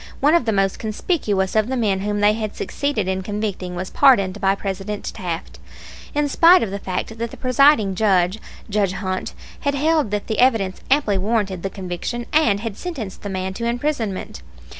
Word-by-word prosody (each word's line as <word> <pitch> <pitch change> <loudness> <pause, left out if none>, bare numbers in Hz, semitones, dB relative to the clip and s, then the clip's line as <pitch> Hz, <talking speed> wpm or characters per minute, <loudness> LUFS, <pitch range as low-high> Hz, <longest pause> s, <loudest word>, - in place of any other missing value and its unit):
One 295 +3 +4
of 340 -8 +3
the 225 - +1
most 195 -2 +1
conspicuous 215 - -1
of 215 0 +3
the 260 +1 -2
men 205 -5 +1
whom 205 +1 -2
they 205 +1 +5
had 215 -1 -4
succeeded 280 -9 -2
in 190 0 -1
convicting 200 -3 -4
was 185 +1 -5
pardoned 205 -8 +4
by 195 -1 +3
President 200 +1 -4
Taft 170 -3 -5 0.6
in 295 0 +2
spite 340 +5 +6
of 210 - -3
the 200 - -4
fact 195 +4 -4
that 235 0 -2
the - - -11
presiding 255 -5 +4
Judge, 190 -1 +2 0.3
Judge 200 -3 0
Hunt, 185 -1 -4 0.2
had 285 0 -1
held 305 -3 +2
that 205 0 -2
the 220 - -3
evidence 225 -7 +2
amply 260 -8 +2
warranted 200 -3 -1
the 195 - -2
conviction, 190 +6 -5
and 225 -10 +3
had 220 -3 -5
sentenced 265 - -6
the 205 - -5
man 190 0 -3
to 235 +4 -4
imprisonment. 235 -4 -2
210 Hz, 185 wpm, -21 LUFS, 190-240 Hz, 0.6 s, spite